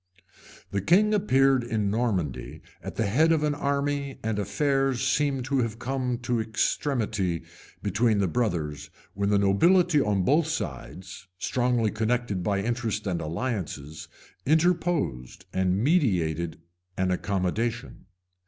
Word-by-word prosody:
The 100 Hz, -, -1 dB
king 205 Hz, -, +4 dB
appeared 135 Hz, -, +3 dB
in 110 Hz, -4 st, -1 dB
Normandy 100 Hz, -, -2 dB, 0.2 s
at -, -, -7 dB
the 115 Hz, -, 0 dB
head 150 Hz, +11 st, +3 dB
of 160 Hz, -2 st, +2 dB
an 150 Hz, -1 st, +1 dB
army 140 Hz, -1 st, -1 dB
and 110 Hz, -2 st, -1 dB
affairs 135 Hz, +4 st, 0 dB
seemed 140 Hz, -3 st, +1 dB
to 135 Hz, 0 st, 0 dB
have 115 Hz, -2 st, -1 dB
come 125 Hz, 0 st, -2 dB
to 120 Hz, -1 st, 0 dB
extremity 110 Hz, -, -1 dB, 0.4 s
between 105 Hz, +2 st, +2 dB
the 100 Hz, -2 st, +2 dB
brothers, 80 Hz, -, -2 dB, 0.2 s
when 100 Hz, +1 st, -1 dB
the 105 Hz, -, +3 dB
nobility 150 Hz, -, +4 dB
on 100 Hz, -5 st, +1 dB
both 150 Hz, -, +3 dB
sides, 90 Hz, -, -6 dB
strongly 120 Hz, -1 st, +1 dB
connected 110 Hz, -3 st, -1 dB
by 100 Hz, +1 st, 0 dB
interest 115 Hz, -2 st, -2 dB
and 90 Hz, -4 st, -1 dB
alliances, 80 Hz, -, -4 dB, 0.4 s
interposed, 155 Hz, -, 0 dB
and 95 Hz, 0 st, +1 dB
meditated 90 Hz, -, +1 dB, 0.4 s
an 95 Hz, 0 st, +1 dB
accommodation. 100 Hz, +5 st, -2 dB
115 Hz, 125 wpm, -26 LUFS, 95-135 Hz, 0.4 s, king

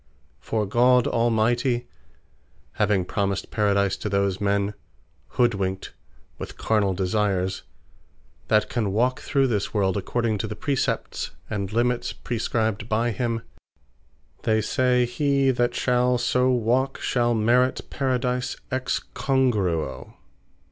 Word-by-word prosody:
For 110 Hz, -2 st, -1 dB
God 125 Hz, +4 st, +4 dB
Almighty, 120 Hz, +2 st, +1 dB, 0.9 s
having 100 Hz, -3 st, +1 dB
promised 100 Hz, 0 st, -2 dB
Paradise 100 Hz, -3 st, +2 dB
to 105 Hz, -, -4 dB
those 100 Hz, -1 st, 0 dB
men 100 Hz, 0 st, +1 dB, 0.6 s
(hoodwinkt 100 Hz, -6 st, 0 dB, 0.5 s
with -, -, -7 dB
carnall 100 Hz, -4 st, +1 dB
desires,) 95 Hz, -1 st, 0 dB, 0.9 s
that 110 Hz, 0 st, +3 dB
can 110 Hz, -5 st, -1 dB
walk 125 Hz, +4 st, +1 dB
through 135 Hz, -2 st, +1 dB
this 110 Hz, -4 st, -1 dB
world 95 Hz, -3 st, +2 dB
according 110 Hz, +2 st, -1 dB
to 110 Hz, -, -2 dB
the 105 Hz, -, -5 dB
Precepts, 140 Hz, +3 st, -2 dB, 0.2 s
and 100 Hz, -2 st, -3 dB
Limits 120 Hz, +1 st, 0 dB
prescribed 110 Hz, -2 st, -2 dB
by 115 Hz, +2 st, +1 dB
him; 115 Hz, 0 st, -2 dB, 1.0 s
they 110 Hz, -2 st, +2 dB
say, 125 Hz, +3 st, +2 dB
he 140 Hz, +2 st, +2 dB
that 120 Hz, -1 st, 0 dB
shall 125 Hz, 0 st, +2 dB
so 125 Hz, +1 st, +2 dB
walk, 125 Hz, +2 st, +1 dB
shall 120 Hz, -1 st, +1 dB
Merit 120 Hz, +4 st, +2 dB
Paradise 125 Hz, -2 st, -1 dB, 0.2 s
Ex 130 Hz, 0 st, -1 dB
Congruo. 100 Hz, -, 0 dB
115 Hz, 115 wpm, -24 LUFS, 100-125 Hz, 1.0 s, God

